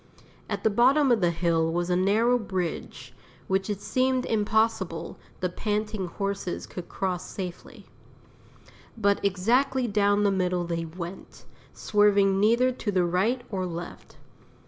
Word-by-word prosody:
At 205 Hz, -2 st, -3 dB
the 220 Hz, -, +3 dB
bottom 260 Hz, +5 st, +4 dB
of 230 Hz, -3 st, +3 dB
the 175 Hz, -, +3 dB
hill 165 Hz, -1 st, +1 dB
was 175 Hz, +1 st, -1 dB
a -, -, +3 dB
narrow 220 Hz, +7 st, +3 dB
bridge, 175 Hz, -, -4 dB, 0.3 s
which 190 Hz, +1 st, 0 dB
it 205 Hz, -1 st, -3 dB
seemed 255 Hz, +2 st, +1 dB
impossible 215 Hz, -5 st, 0 dB, 0.2 s
the 180 Hz, -, 0 dB
panting 210 Hz, 0 st, -2 dB
horses 195 Hz, 0 st, -4 dB
could 180 Hz, -, -9 dB
cross 185 Hz, -2 st, -2 dB
safely. 180 Hz, -3 st, -8 dB, 1.1 s
But 200 Hz, -2 st, +1 dB
exactly 240 Hz, +7 st, +1 dB
down 205 Hz, -1 st, +2 dB
the 200 Hz, -, +3 dB
middle 180 Hz, -2 st, 0 dB
they 170 Hz, -1 st, -3 dB
went, 170 Hz, +3 st, -9 dB, 0.3 s
swerving 200 Hz, -2 st, +3 dB
neither 235 Hz, +5 st, +3 dB
to 240 Hz, -4 st, -3 dB
the 185 Hz, -2 st, +2 dB
right 205 Hz, +9 st, 0 dB
or 185 Hz, -2 st, -2 dB
left. 170 Hz, 0 st, -8 dB
200 Hz, 140 wpm, -26 LUFS, 180-220 Hz, 1.1 s, bottom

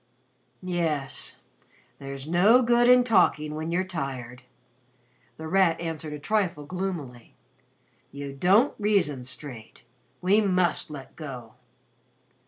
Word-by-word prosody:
'" -, -, -42 dB, 0.2 s
"Yes. 165 Hz, -6 st, -2 dB, 0.6 s
There's 135 Hz, -1 st, -7 dB
no 200 Hz, +10 st, +5 dB
good 240 Hz, 0 st, +4 dB
in 250 Hz, 0 st, +7 dB
talking 180 Hz, -9 st, +2 dB
when 155 Hz, +2 st, -4 dB
you're 180 Hz, +2 st, +1 dB
tired," 135 Hz, -8 st, -5 dB, 1.0 s
The 160 Hz, -, -7 dB
Rat 180 Hz, -2 st, +3 dB
answered 160 Hz, -2 st, -5 dB
a -, -, -5 dB
trifle 170 Hz, -2 st, -1 dB
gloomily. 160 Hz, -9 st, -6 dB, 0.8 s
"You 140 Hz, 0 st, -7 dB
don't 195 Hz, -, +3 dB
reason 190 Hz, -12 st, +1 dB
straight. 125 Hz, -2 st, -9 dB, 0.4 s
We 195 Hz, +4 st, +3 dB
must 185 Hz, -5 st, +1 dB
'let 135 Hz, -3 st, -10 dB
go.'" 130 Hz, -8 st, -8 dB
160 Hz, 115 wpm, -26 LUFS, 140-190 Hz, 1.0 s, in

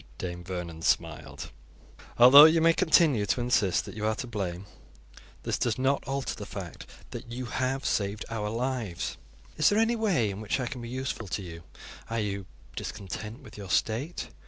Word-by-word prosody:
Dame 90 Hz, -1 st, -5 dB
Vernon 85 Hz, -3 st, -6 dB
smiled. -, -, -1 dB, 0.7 s
"Although 130 Hz, +5 st, +11 dB
you 160 Hz, +1 st, +5 dB
may 165 Hz, +1 st, +5 dB
continue 155 Hz, -, +3 dB
to 110 Hz, -, +1 dB
insist 120 Hz, -6 st, +2 dB
that -, -, -8 dB
you 110 Hz, -, -5 dB
are 110 Hz, -, +1 dB
to 130 Hz, -, -5 dB
blame, 100 Hz, -6 st, -4 dB, 0.8 s
this -, -, -1 dB
does 115 Hz, -3 st, 0 dB
not 135 Hz, +2 st, +1 dB
alter 135 Hz, 0 st, -2 dB
the -, -, -8 dB
fact -, -, -8 dB, 0.2 s
that 120 Hz, -, -8 dB
you 125 Hz, +1 st, -4 dB
have 130 Hz, +2 st, -2 dB
saved 100 Hz, +1 st, -1 dB
our 105 Hz, -2 st, -3 dB
lives. 115 Hz, -5 st, -3 dB, 0.4 s
Is 155 Hz, -, +5 dB
there 205 Hz, -, +1 dB
any 225 Hz, +2 st, +3 dB
way 180 Hz, -, +1 dB
in 100 Hz, +2 st, -7 dB
which 110 Hz, +5 st, -1 dB
I 130 Hz, -, -1 dB
can 125 Hz, 0 st, -5 dB
be 120 Hz, -, -7 dB
useful 130 Hz, -3 st, -4 dB
to 95 Hz, +2 st, -3 dB
you? 85 Hz, -2 st, -9 dB, 0.5 s
Are 115 Hz, 0 st, -1 dB
you 100 Hz, -3 st, -3 dB, 0.3 s
discontent 105 Hz, -, -6 dB
with 110 Hz, -4 st, -12 dB
your 100 Hz, -2 st, -8 dB
state? 120 Hz, -, -1 dB
115 Hz, 180 wpm, -28 LUFS, 100-135 Hz, 0.8 s, Although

